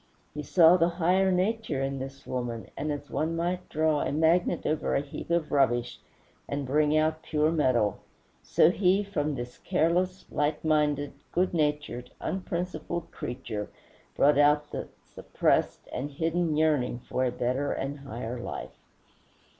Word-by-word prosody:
He 150 - -4
saw 170 +3 +6
the 170 0 +3
higher 185 +2 +3
nature 185 -6 0
in 135 0 -2
this 135 +1 -8
woman, 120 -3 -4
and 150 +2 -2
as 145 0 -6
one 160 +2 -1
might 175 +2 -2
draw 155 -1 +1
a - - -1
magnet 165 +3 +2
over 155 0 0
a - - +2
heap 145 +2 -8
of 170 -2 0
rubbish 120 -4 +1 0.5
and 140 0 -2
bring 150 +3 +2
out 155 0 +1
pure 155 0 +1
metal, 125 - +2 0.4
so - - +4
he 190 +2 +2
from 155 -7 -2
this 120 -1 -7
careless, 180 +3 0
light 150 +1 -1
minded, 150 -2 +1 0.2
good 180 +1 +1
natured, 150 -6 -1
unprincipled 180 -2 -4
creature 120 -4 -5 0.5
brought 145 0 +4
out 150 0 +4
the - - -4 0.2
suppressed - - 0
and 140 +3 -3
hidden 165 +2 0
yearning 150 -6 +2
for 130 - 0
a 125 - +1
better 125 +3 -1
and 140 +2 -3
higher 125 -3 -6
life. - - -7
150 Hz, 150 wpm, -28 LUFS, 135-170 Hz, 0.5 s, saw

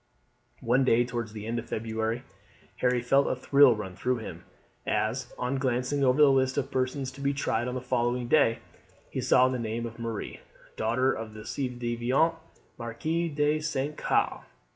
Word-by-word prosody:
One 125 +2 +3
day 120 -1 +4
towards 120 -3 -4
the 105 -1 -7
end 115 +1 -2
of 120 - -9
February 110 +2 -2 0.5
Harry 125 -1 +1
felt 135 +3 +3
a - - 0
thrill 140 -1 +5
run 95 -4 -6
through 125 +5 0
him 110 - -8 0.4
as, 120 +3 -1
on 125 +2 -1
glancing 130 +2 0
over 130 +2 +3
the 145 -2 +7
list 130 -1 +2
of - - -1
persons 130 +1 -1
to 135 +2 -11
be 140 0 0
tried 120 -4 -1
on 125 - -3
the 130 - -3
following 120 0 0
day, 120 -5 +3 0.5
he 130 - -2
saw 125 +1 +5
the 130 -1 -2
name 115 +1 -3
of 115 0 -8
Marie, 115 -2 -5 0.4
daughter 125 +4 +1
of 110 -1 -7
the 110 - -8
ci 135 +2 -3
devant 120 +6 +1 0.5
Marquis 155 +9 -2
de 150 +1 +1
St. 150 -1 -2
Caux. - - 0
125 Hz, 180 wpm, -28 LUFS, 115-135 Hz, 0.5 s, the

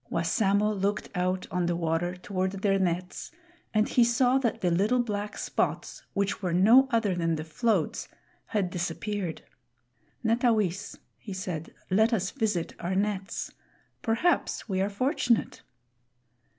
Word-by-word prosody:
Wassamo 200 +5 +2
looked 200 0 -1
out 185 0 0
on 180 -1 0
the 175 - +1
water 170 +1 -1
toward 185 +1 -2
their 195 0 +1
nets, 180 0 -2 0.4
and 215 0 +2
he 245 - +4
saw 245 +2 +3
that 240 -4 -1
the 180 -2 +2
little 205 +8 +2
black 210 -2 -4
spots, - - -2
which 200 +1 -1
were 180 -3 -1
no 225 +9 +6
other 225 -4 +2
than 165 -2 0
the 155 - -4
floats, 195 +2 0 0.4
had 195 -5 -1
disappeared. 180 +1 -3 0.8
"Netawis," 220 -5 +1 0.2
he 205 - -7
said, 180 -4 -5 0.2
"let 220 +5 +4
us 195 -4 0
visit 210 -10 -1
our 180 +2 -2
nets; 200 -1 -2 0.5
perhaps 235 +9 +1
we 190 -3 0
are 195 - +1
fortunate." 245 +2 0
195 Hz, 135 wpm, -28 LUFS, 180-220 Hz, 0.8 s, no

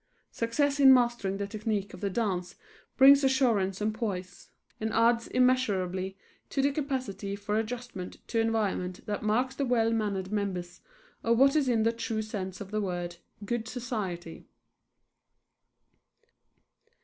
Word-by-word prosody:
Success 280 +5 0
in 270 -1 +9
mastering 240 -6 +3
the 200 - -2
technique 205 -1 -3
of 185 - -10
the 200 - 0
dance 185 -4 -2 0.4
brings 275 +1 +8
assurance 235 -8 +2
and 215 +1 0
poise, 195 -5 -5 0.3
and 220 0 -2
adds 230 +1 +3
immeasurably 195 -7 +1 0.3
to - - -3
the 280 +1 +3
capacity 260 -9 -3
for 205 +1 -3
adjustment 225 -4 -4
to 230 - 0
environment 210 -5 -1
that 205 -1 -3
marks 245 +5 +1
the 275 - -2
well 235 -3 +2
mannered 200 -4 -2
members 185 -4 -3 0.4
of 230 0 +3
what 275 +3 +5
is 285 -4 +2
in 225 -3 +2
the 230 +1 +2
true 225 -1 -3
sense 190 -4 -5
of 200 -1 -8
the 215 0 0
word 175 -3 -3 0.3
"good 230 +1 -2
society." 210 -9 -5
220 Hz, 140 wpm, -29 LUFS, 195-245 Hz, 0.4 s, in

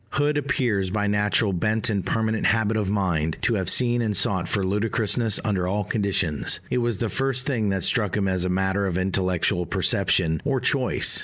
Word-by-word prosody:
Hood 145 +1 +1
appears, 125 -9 0
by 105 +2 -1
natural 105 0 +1
bent 110 +6 0
and 100 -5 0
permanent 110 -1 0
habit 110 0 +1
of 105 -3 -1
mind, 85 -6 -1
to - - +2
have 95 -4 0
seen 120 -1 +2
and 105 -4 -1
sought 95 -1 +1
for 100 -3 -1
ludicrousness 110 +2 0
under 95 -4 0
all 105 +3 -1
conditions 95 -7 0
it - - +1
was 120 -3 -1
the 115 - -2
first 130 +2 -1
thing 115 -7 -1
that 95 -1 -1
struck 105 -4 +1
him 100 -2 0
as 95 -1 0
a 90 - -1
matter 95 +2 0
of 90 -2 -2
intellectual 95 -1 0
perception 80 -1 +1
or 135 -2 0
choice. 130 0 +1
105 Hz, 190 wpm, -24 LUFS, 95-115 Hz, -, to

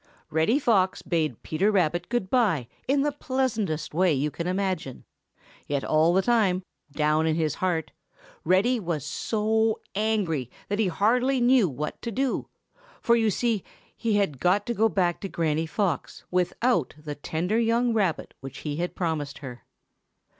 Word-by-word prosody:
Reddy 160 - +3
Fox 200 -9 +2
bade 155 - -1
Peter 190 +7 +1
Rabbit 175 -3 +1
good 235 -6 -1
by 195 - +2 0.2
in 275 +1 +2
the 295 - +1
pleasantest 245 - -2
way 180 +2 +3
you 150 +1 0
can 170 +3 -4
imagine, 185 -7 -2 0.6
yet 140 -1 -1
all 155 +2 +3
the 190 +2 +3
time, 200 -6 +2 0.3
down 155 +2 +2
in 160 - +2
his 155 -3 0
heart, 175 -3 -1 0.5
Reddy 220 +7 +3
was 170 -7 -3
so 220 0 0
angry 195 - 0 0.2
that 205 +1 -1
he 215 - +3
hardly 245 +9 +2
knew 245 -5 +4
what 150 +3 -5
to 235 - -4
do, 265 +4 -1 0.5
for 235 - +3
you 225 -2 +2
see 220 0 0 0.3
he 225 -2 0
had 195 -10 0
got 190 +6 +2
to 240 - -1
go 225 0 +3
back 175 -4 0
to 195 - -4
Granny 160 -1 0
Fox 185 -3 -2
without 180 - +1
the 150 -1 -6
tender 170 +9 -1
young 235 +1 +2
rabbit 195 -7 0
which 135 0 -9
he 145 -1 -2
had 175 +1 -3
promised 150 -5 -2
her. 125 -4 -9
185 Hz, 160 wpm, -26 LUFS, 155-225 Hz, 0.6 s, knew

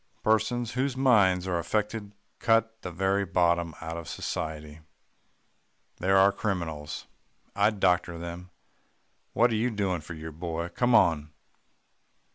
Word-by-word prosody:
Persons 110 +2 +1
whose 130 +1 -1
minds 100 -9 +4
are 90 -2 -1
affected 105 +3 -2 0.2
cut 115 0 +2
the 90 - -5
very 95 +3 0
bottom 85 -3 +1
out 80 0 -5
of 85 - -7
society. 75 -1 -5 1.2
They're 95 +2 +2
our 95 +1 +6
criminals. 85 -8 -4 0.5
I'd 105 0 +2
doctor 90 -1 +2
them. 85 +1 -7 0.8
What 120 +1 +4
are - - +1
you 115 +3 +1
doing 100 -6 -1
for 85 +2 -8
your 80 0 -7
boy; 85 +1 -4
come 120 +7 +1
now. 80 -9 +4
95 Hz, 130 wpm, -28 LUFS, 85-110 Hz, 1.2 s, our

